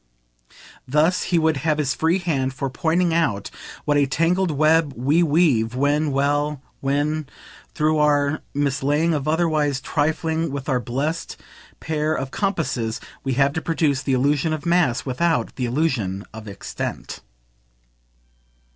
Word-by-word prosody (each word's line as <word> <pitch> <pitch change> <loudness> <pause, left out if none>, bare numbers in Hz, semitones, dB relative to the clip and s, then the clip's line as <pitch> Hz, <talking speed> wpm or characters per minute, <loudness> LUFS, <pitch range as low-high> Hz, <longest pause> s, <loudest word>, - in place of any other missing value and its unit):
Thus 155 +7 +2
he 175 - +1
would 160 -2 +2
have 150 +2 0
his 145 -3 0
free 165 +3 +1
hand 135 -8 -1
for 135 0 -3
pointing 170 +3 +1
out 120 -12 0 0.3
what 145 -1 +2
a 140 -1 +3
tangled 170 +6 +1
web 155 0 +3
we 140 +8 +2
weave 145 -8 +2
when 145 +3 +1
well, 145 +1 0 0.2
when, 145 +2 -1 0.5
through 155 0 +2
our 145 0 +2
mislaying 145 +3 +1
or 150 - 0
otherwise 155 -4 +1
trifling 160 +3 -1
with 140 -1 -5
our 130 -3 +1
blest 140 +7 -3 0.4
pair 155 0 -1
of 135 -2 -4
compasses, 145 - -1 0.2
we 135 - -1
have 140 +2 +2
to 160 - -2
produce 155 -5 0
the 135 - -1
illusion 145 +4 +1
of 155 0 -5
mass 170 -8 +2
without 160 +6 0
the 125 - -2
illusion 120 - -1
of 110 0 -9
extent. 100 -1 -6
150 Hz, 140 wpm, -22 LUFS, 135-160 Hz, 0.5 s, a